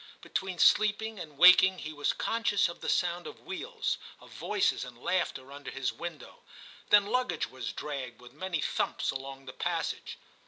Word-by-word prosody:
Between 190 -2 -3
sleeping 215 +3 +3
and 150 -5 -9
waking 185 +2 +8
he 155 -2 -6
was 145 -1 +1
con 230 0 -2
scious 205 -3 +3
of 170 - -9
the - - -3
sound 175 0 0
of - - -10
wheels, 445 +6 -3 0.2
of - - -16
voices - - 0
and - - -10
laughter 140 -7 -2
under 140 -1 -8
his 135 -1 -2
window, 170 -3 -8 0.5
then 205 -1 +7
luggage 250 +4 0
was 130 0 -5
dragged 140 -5 -6
with 125 0 -14
many 170 0 -3
thumps - - -1
along 135 0 -7
the 130 - -8
passage. - - -3
175 Hz, 170 wpm, -30 LUFS, 140-205 Hz, 0.5 s, waking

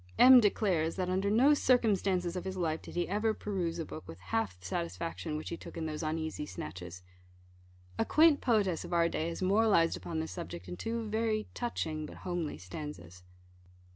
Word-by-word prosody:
M. 255 0 +10
declares, 190 -7 +1
that 185 -1 -2
under 190 +2 +1
no 255 +8 +5
circumstances 195 -10 +2
of 180 - -3
his 190 0 -4
life 160 -3 -1
did - - -11
he 175 - 0
ever 215 +2 0
peruse 185 -5 -2
a 165 - -3
book 155 - -9
with 80 +2 -9
half 90 0 -2
the 90 - -15
satisfaction 90 - -3
which 155 - -6
he 170 - -4
took - - -10
in 165 - -3
those 155 -1 -4
uneasy 155 -1 -3
snatches. 90 +1 -7 1.0
A - - +4
quaint 310 -2 +5
poetess 205 -8 +1
of - - -6
our 170 -1 +4
day 165 0 -2
has 170 +2 -4
moralised 195 -4 +4
upon 160 -1 -4
this 160 - -4
subject 90 - -7
in 90 - -5
two 225 - -3
very 220 0 0
touching 160 -10 -3
but - - -11
homely 175 -4 -2
stanzas. 90 - -8
170 Hz, 190 wpm, -32 LUFS, 150-210 Hz, 1.0 s, M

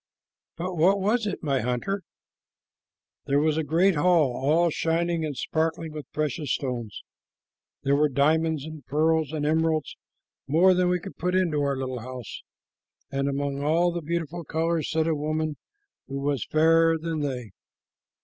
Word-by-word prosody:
"But 180 +1 -4
what 190 +5 +4
was 215 +3 +1
it, 200 - -4
my 140 -3 +1
hunter?" 125 - -2 1.3
"There 140 +1 +3
was 155 0 +2
a 160 - 0
great 170 +6 +3
hall, 160 -3 +3
all 160 +6 +2
shining 165 +1 0
and 150 -4 -3
sparkling 160 0 -1
with 150 -3 -8
precious 150 -2 -2
stones. 120 -6 -5 0.8
There 140 +1 +3
were 150 +1 +3
diamonds 155 +2 +1
and 155 -2 -9
pearls 155 +1 +1
and 150 -2 -2
emeralds, 160 0 +1 0.5
more 175 +6 +5
than 180 0 +2
we 180 0 +1
could 195 +3 -10
put 180 +1 -1
into 170 -6 +1
our 140 -1 0
little 130 -1 -3
house, 125 -1 -8 0.7
and 140 0 0
among 140 0 -2
all 165 +4 +2
the 170 0 -4
beautiful 170 +1 -3
colors 160 +1 -1
sat 160 0 +1
a 165 - +2
woman 155 0 -2 0.5
who 135 - -5
was 140 -4 -1
fairer 165 +1 +4
than 160 0 -3
they. 125 -7 -3
155 Hz, 160 wpm, -26 LUFS, 140-165 Hz, 1.3 s, more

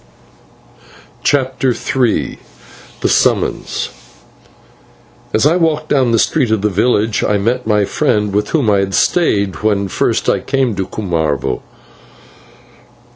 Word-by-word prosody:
CHAPTER 130 -2 +1
III 125 -4 -1 0.6
THE - - +1
SUMMONS - - 0 1.4
As 110 - +2
I 155 +3 +4
walked 155 -3 0
down 130 -4 +2
the 115 - +3
street 130 +2 +1
of 110 -2 0
the 105 - +2
village 105 +1 +1
I 105 - +1
met 115 +4 -1
my 105 -2 +2
friend, 105 +1 0
with 105 +1 0
whom 145 -8 +1
I 100 - +3
had 95 -1 -1
stayed 100 - +1
when 100 -2 +1
first - - 0
I - - +2
came 135 -4 0
to 95 - -2
Cumarvo. 80 -9 -2
110 Hz, 130 wpm, -16 LUFS, 100-130 Hz, 1.4 s, I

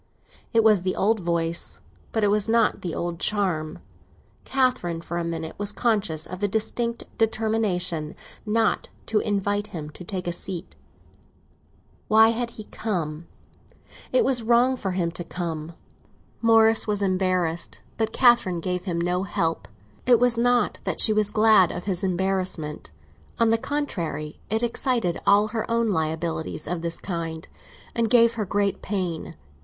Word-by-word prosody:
It 230 -2 +4
was 215 -4 +5
the 185 +1 -1
old 220 +2 +2
voice, 170 -1 -1 0.3
but 220 - 0
it 205 - +4
had 210 +1 +1
not 230 -1 +2
the 175 -3 -4
old 170 -1 -3
charm. 180 -8 0 0.7
Catherine, 255 -11 0
for 170 +1 -4
a - - -2
minute, 165 -1 -4
was 205 0 -1
conscious 205 -9 0
of 185 +2 -8
a 205 - +2
distinct 230 +3 -1 0.2
determination 215 -8 0 0.3
not 220 0 +1 0.2
to 220 - +1
invite 205 0 -1
him 150 -3 -7
to 180 - -11
take 185 0 -4
a 175 - -1
seat. 180 0 -5 1.3
Why 220 +1 +6
had 235 +1 -1
he 215 - -6
come? 170 -8 -4 0.8
It - - +3
was 255 -3 +3
wrong 240 +3 +3
for 195 -7 -3
him 175 -2 0
to 175 - -2
come. 165 -2 -5 0.7
Morris 225 -1 +5
was 205 -1 0
embarrassed, 185 -3 0 0.2
but 220 -1 0
Catherine 240 -9 +4
gave 180 +1 -3
him 170 -3 -2
no 180 +1 0
help. 165 -3 -1 0.4
It 245 -2 +6
was 245 -1 +3
not 240 -1 +2
that - - -2
she 215 - +4
was 210 -1 +1
glad 215 -4 +5
of 180 - -6
his 190 -3 -1
embarrassment; 185 - -2 0.5
on 230 -1 +3
the 225 - +4
contrary, 170 - -3
it 220 +3 0
excited 235 -6 0
all 205 +2 +5
her 225 +1 -3
own 230 -1 +1
liabilities 160 -2 -2
of 175 0 -2
this 165 0 -3
kind, 165 -3 -5 0.5
and 230 -1 0
gave 235 -1 +5
her 220 -3 -2
great 200 +1 0
pain. 185 -5 -3
195 Hz, 155 wpm, -25 LUFS, 170-225 Hz, 1.3 s, Why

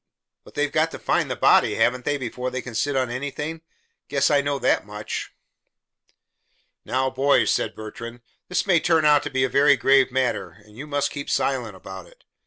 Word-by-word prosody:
But - - -17
they've 145 0 0
got 155 +1 +2
to - - -8
find - - 0
the - - -2
body, - - +4
haven't 125 0 +1
they, 145 - 0
before 125 -1 -4
they 130 -1 -5
can 125 - -8
sit 140 +5 -1
on 130 -2 0
anything? 150 +5 -5 0.5
Guess 140 +1 +1
I 145 -1 +4
know 145 0 -1
that - - +1
much." 105 0 -6 1.5
"Now, 130 +1 -1
boys," 140 +2 +3
said - - -1
Bertrand, 115 +2 -9 0.3
"this 180 - -1
may 180 -4 +4
turn 160 -1 +2
out 150 -1 +5
to 145 - -5
be 130 -1 0
a - - +3
very 140 +2 +4
grave 135 +1 +4
matter, 125 -9 -1
and 105 0 -19
you 140 +6 -8
must 145 -1 -1
keep 140 -1 -6
silent 125 -7 -1
about 95 0 -10
it. - - -22
135 Hz, 195 wpm, -23 LUFS, 125-145 Hz, 1.5 s, out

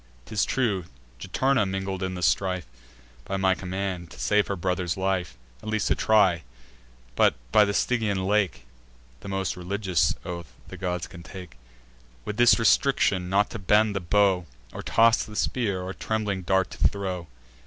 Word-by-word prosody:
'Tis 105 +8 0
true, 105 -9 0 0.3
Juturna 130 - +1
mingled 95 0 -3
in 95 0 -2
the 90 - -5
strife 90 -3 +1 0.6
By 95 - -3
my 95 -1 +3
command, 95 -2 -4
to - - -13
save 105 0 +2
her 100 - -2
brother's 90 -1 -2
life, 95 -2 -1 0.2
At - - -6
least 110 -2 0
to - - +3
try; 100 -6 +3 0.7
but, - - +4 0.2
by 105 - +6
the 100 - -1
Stygian 105 -7 0
lake, 100 -8 0 0.5
(The - - -10
most 95 -1 -2
religious 90 -1 0
oath 85 -4 -6 0.2
the - - -8
gods 90 -1 -3
can 85 -1 -12
take,) 90 -5 -10 0.7
With 105 - -4
this 120 0 +6
restriction, 100 -4 +2
not 100 +2 +2
to - - -5
bend 105 +2 +3
the - - 0
bow, 95 0 +2 0.3
Or - - -6
toss 115 +1 +4
the 105 - -10
spear, 105 -6 -1
or 95 +1 -5
trembling 105 +1 -2
dart 95 0 +1
to - - -10
throw. 95 -4 0
95 Hz, 165 wpm, -26 LUFS, 90-105 Hz, 0.7 s, by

